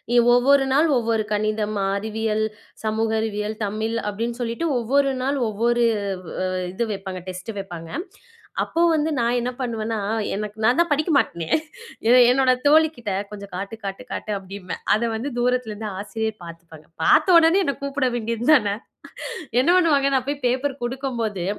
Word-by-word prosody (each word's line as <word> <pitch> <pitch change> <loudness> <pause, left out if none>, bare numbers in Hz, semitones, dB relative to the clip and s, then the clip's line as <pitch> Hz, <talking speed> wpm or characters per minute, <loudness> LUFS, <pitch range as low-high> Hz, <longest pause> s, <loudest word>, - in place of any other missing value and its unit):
இ - - +6 0.2
ஒவ்வொரு 270 +3 +4
நாள் 300 +4 +4
ஒவ்வொரு 225 -2 0
கணிதம், 215 0 -1 0.2
அறிவியல், 220 +1 -1 0.4
சமூக 220 +1 0
அறிவியல், 210 0 -3
தமிழ் 220 +3 -2
அப்படின்னு 230 +4 -4
சொல்லிட்டு 235 +8 -2
ஒவ்வொரு 275 +4 +2
நாள் 275 +1 0
ஒவ்வொரு 235 +3 +1 0.4
வ - - -8 0.4
இது 235 +5 -1
வைப்பாங்க. 190 -2 -6
டெஸ்ட் 185 +4 -7
வைப்பாங்க. 175 -4 -7 0.7
அப்போ 335 - -1
வந்து 310 0 +1
நான் 240 0 +1
என்ன 245 +1 -2
பண்ணுவேன்னா, 225 -2 -2 0.4
எனக்கு 210 +1 -5
நான் 245 +5 +4
தான் 340 - +3
படிக்க 300 +3 +1
மாட்டேனே. 170 -10 -1 0.8
என்னோட 260 +1 +4 0.2
தோழி 315 +2 +6
கிட்ட 225 -4 -4 0.2
கொஞ்சம் 200 -1 -9
காட்டு 195 +4 -5
காட்டு 195 +4 -5
காட்டு 215 - -4
அப்படிம்பேன். 190 -1 -7
அத 215 - +1
வந்து 235 +6 -3
தூரத்துல 250 -2 0
இருந்து 210 +1 -5
ஆசிரியர் 220 +1 -4
பாத்துப்பாங்க. 165 -2 -12 0.2
பாத்த 365 - +5
ஒடனே 335 +4 +5
என்னை 280 -5 -1
கூப்பிட 280 -2 0
வேண்டியதுதானே? 230 -1 +2 0.9
என்ன 260 - +1
பண்ணுவாங்க? 285 -6 +3
நான் 255 -1 -1
போய் 285 -1 -3
பேப்பர் 265 +3 -1
குடுக்கும்போது, 240 -7 -3
225 Hz, 150 wpm, -23 LUFS, 210-265 Hz, 0.9 s, இ